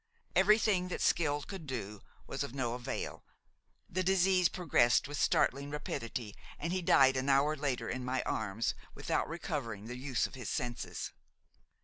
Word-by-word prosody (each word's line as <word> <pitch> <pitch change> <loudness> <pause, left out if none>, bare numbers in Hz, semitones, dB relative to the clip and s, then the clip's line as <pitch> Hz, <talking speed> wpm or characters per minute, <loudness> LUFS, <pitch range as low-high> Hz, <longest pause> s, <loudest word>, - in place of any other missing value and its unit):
Everything 200 -1 +4
that 180 - -4
skill 145 -3 +2
could 190 -6 -8
do 105 -6 -5 0.2
was - - -4
of 125 - -6
no 120 -3 -1
avail, 120 0 -4 0.6
the 185 - -1
disease 185 -1 +4
progressed 130 -11 +3
with 145 -1 -3
startling 140 +2 +2
rapidity, 120 -6 -4 0.2
and 170 +3 -2
he 185 - 0
died 135 -5 +5
an 130 +1 0
hour 140 +3 +4
later, 135 -5 -2
in 130 0 -3
my 130 +1 -1
arms, 110 +1 -1 0.2
without - - -1
recovering 140 - -4
the 125 +2 -6
use 130 -1 0
of - - -7
his 130 -2 -5
senses. 120 -1 -3
140 Hz, 155 wpm, -33 LUFS, 120-170 Hz, 0.6 s, died